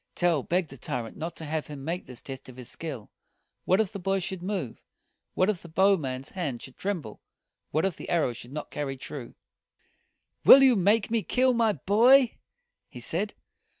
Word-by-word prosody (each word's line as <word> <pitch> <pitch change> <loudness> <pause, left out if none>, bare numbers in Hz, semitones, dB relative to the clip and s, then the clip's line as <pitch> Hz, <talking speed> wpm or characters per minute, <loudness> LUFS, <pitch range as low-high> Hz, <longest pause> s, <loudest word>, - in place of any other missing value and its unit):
Tell 175 -5 +2
begged 175 +1 -1
the 135 - -10
tyrant 115 -1 -4
not 165 +1 -5
to 160 - -8
have 155 0 -3
him 140 -2 -8
make 170 +3 -3
this 125 -2 -10
test 135 -1 -9
of 125 - -12
his 125 -2 -9
skill. 140 -10 -7 0.5
What 185 - +3
if 215 -4 +1
the 200 - -5
boy 195 +2 0
should 190 -1 -4
move? 180 - -4 0.5
What 185 - +3
if 210 -5 -1
the 170 - -12
bow 190 +5 +4
man's 130 -5 -5
hand 145 -11 -4
should 130 - -11
tremble? 175 - -4 0.5
What 155 +4 +1
if 195 - -2
the - - -8
arrow 160 -8 +1
should 120 +2 -11
not 150 +1 -6
carry 135 -2 -3
true? 130 -2 -8 1.1
"Will 275 - +10
you 260 -2 +6
make 205 +3 +2
me 230 -1 +2
kill 255 +4 +2
my 230 -2 +2
boy?" 235 - +4 0.5
he - - -10
said. - - -3
170 Hz, 195 wpm, -27 LUFS, 135-200 Hz, 1.1 s, Will